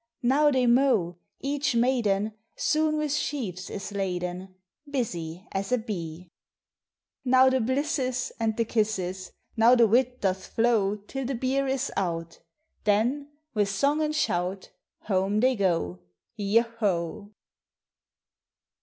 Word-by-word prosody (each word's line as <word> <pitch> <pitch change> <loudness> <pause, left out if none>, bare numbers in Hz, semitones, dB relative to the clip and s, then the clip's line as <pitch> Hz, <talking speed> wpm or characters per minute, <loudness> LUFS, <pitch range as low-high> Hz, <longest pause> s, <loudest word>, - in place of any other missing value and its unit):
Now 285 +5 +4
they 260 -3 +2
mow; 235 -9 +3 0.2
each 285 -1 -1
maiden 220 -4 +1 0.2
Soon 310 0 +1
with 300 -2 -1
sheaves 225 - -3
is 200 0 -6
laden, 185 -1 -3 0.3
Busy 180 - -4
as 195 +2 -3
a 250 - +4
bee. 180 -7 -6 1.0
Now 260 0 +5
the 260 -1 +2
blisses, 260 0 -1
And 220 -1 0
the 230 - +1
kisses! 190 -5 -1 0.2
Now 230 +2 +6
the 235 -2 +6
wil 240 +5 +4
doth 190 -1 -1
flow 225 -4 +3
Till 230 +6 -6
the 265 +1 -2
beer 265 +3 0
is 270 +1 -1
ou1; 170 -3 -3 0.4
Then, 240 +8 +1 0.3
with 205 -3 +1
song 280 +10 +1
ami 305 0 0
shout, 185 -9 -1 0.3
Home 195 +1 0
they 255 +3 +3
go, 165 - 0 0.4
yo 210 +2 +3
ho! 205 -4 -2
220 Hz, 125 wpm, -27 LUFS, 190-260 Hz, 1.0 s, Now